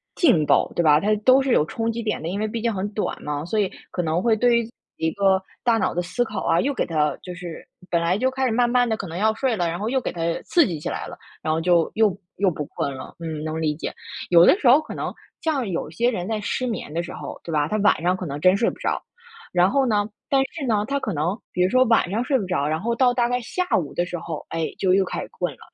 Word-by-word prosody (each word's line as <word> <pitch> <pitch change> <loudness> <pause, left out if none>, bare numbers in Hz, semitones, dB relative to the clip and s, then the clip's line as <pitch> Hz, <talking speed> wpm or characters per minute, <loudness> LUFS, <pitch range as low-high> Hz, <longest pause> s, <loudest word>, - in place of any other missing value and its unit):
劲 235 - +4
爆， 140 - +3
对 170 - +2
吧？ 150 -1 +6
它 210 +4 +2
都 255 +5 +5
是 265 -2 0
有 150 - +4
冲 225 +6 -2
击 235 0 -4
点 215 - -2
的， 160 - -4
因 200 +3 -3
为 215 - 0
毕 225 +1 -4
竟 230 -1 +1
很 195 +1 -2
短 210 - -2
嘛， 150 0 -3
所 215 +5 -1
以 195 - +1 0.2
可 180 - -1
能 165 +2 0
会 230 -2 +3
对 240 +1 +3
于 230 0 -4 0.3
一 160 - 0
个 195 0 +2 0.2
大 235 -2 +3
脑 - - 0
的 175 - 0
思 185 +8 -1
考 215 -4 -5
啊， 170 - +3
又 280 +2 0
给 - - -1
它 150 -3 0
就 180 - -7
是 175 -2 -8 0.2
本 170 - +2
来 175 +3 +1
就 260 +3 +2
开 265 0 -1
始 240 - +1
慢 240 +1 +2
慢 245 0 +3
地 220 - 0
可 195 - -6
能 165 +2 -6
要 220 +2 +2
睡 245 0 0
了， 175 -3 0
然 170 +2 -3
后 215 +2 -2
又 265 0 +1
给 - - -3
它 170 - -6 0.2
刺 340 -6 +3
激 165 -5 -4
起 - - -6
来 - - -4
了， - - -9 0.2
然 155 - -1
后 160 - +1
就 170 -1 +2
又 215 -4 +3 0.2
又 195 -2 +2
不 150 - -4
困 140 - -3
了。 130 - -9
嗯， 160 -2 -5
能 160 0 -3
理 150 -2 0
解。 - - -4 0.4
有 170 -1 +7
的 370 - +6
时 260 - +1
候 265 +5 +8
可 310 - -8
能 - - -3 0.3
像 280 -8 0
有 170 -4 -3
些 240 +9 +1
人 180 -4 -3
在 220 -1 -1
失 255 +4 -2
眠 190 -9 -4
的 170 - 0
时 175 - -7
候， - - -8
对 165 - -6
吧， 150 -1 +1
他 215 - -1
晚 205 -5 +3
上 180 +1 +2
可 185 -3 -5
能 145 +1 -5
真 185 +4 +5
睡 230 - +2
不 - - -9
着。 - - -2 0.5
然 180 +2 +4
后 275 -1 +3
呢， 210 -2 +1 0.2
但 270 -1 +4
是 305 -5 -4
呢， 210 -2 +1
他 280 0 0
可 210 -7 -3
能 170 +8 -1
比 180 - +2
如 185 - +3
说 255 +1 +5
晚 225 -5 +3
上 230 +4 0
睡 265 +1 +2
不 200 - -3
着， 165 -6 0
然 155 +1 0
后 235 +2 0
到 245 0 +3
大 240 -1 +1
概 245 0 0
下 365 +10 -2
午 160 -6 -3
的 175 - 0
时 175 -1 -5
候， 160 -3 -6
哎， 165 -1 -1
就 185 -1 +2
又 195 0 +3
开 - - -4
始 - - -7
困 465 - -3
了， - - -22
200 Hz, 315 characters per minute, -23 LUFS, 170-235 Hz, 0.5 s, 候